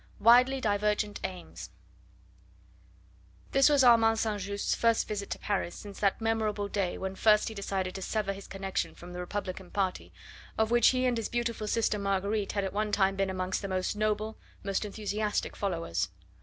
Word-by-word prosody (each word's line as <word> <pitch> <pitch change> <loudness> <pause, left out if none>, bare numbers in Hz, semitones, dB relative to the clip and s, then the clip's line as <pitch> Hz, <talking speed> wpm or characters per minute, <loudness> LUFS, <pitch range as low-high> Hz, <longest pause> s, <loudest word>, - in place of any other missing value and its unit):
WIDELY 250 +4 +6
DIVERGENT 210 -1 0
AIMS 180 -2 -6 1.8
This 275 +2 +5
was 285 -2 +5
Armand 230 -2 +6
S. 210 -2 -2
Just's 200 0 -1
first 230 -1 +2
visit 200 -1 -4
to - - -3
Paris 195 -4 -2
since 200 -1 -9
that 200 -2 +2
memorable 220 -2 0
day 195 -3 -1
when 190 0 -4
first 210 +2 +4
he - - -7
decided 195 -2 -3
to 190 - -6
sever 200 0 -1
his 195 0 -10
connection 195 0 -3
from 175 +1 -11
the 180 - -6
Republican 185 0 -5
party, 190 -2 -2 0.5
of 220 +1 +1
which 240 -1 +5
he 255 0 +3
and 245 -2 +2
his 225 - -2
beautiful 235 -2 -2
sister 215 -1 +1
Marguerite 200 +1 -1
had 200 - 0
at 190 - -3
one 210 +1 -1
time 195 -1 +2
been 195 0 0
amongst 185 0 -2
the 200 - -4
most 185 +1 -1
noble, 215 +1 -1 0.2
most 195 +1 -1
enthusiastic 210 0 -2
followers. 165 - -2
205 Hz, 175 wpm, -30 LUFS, 195-220 Hz, 1.8 s, WIDELY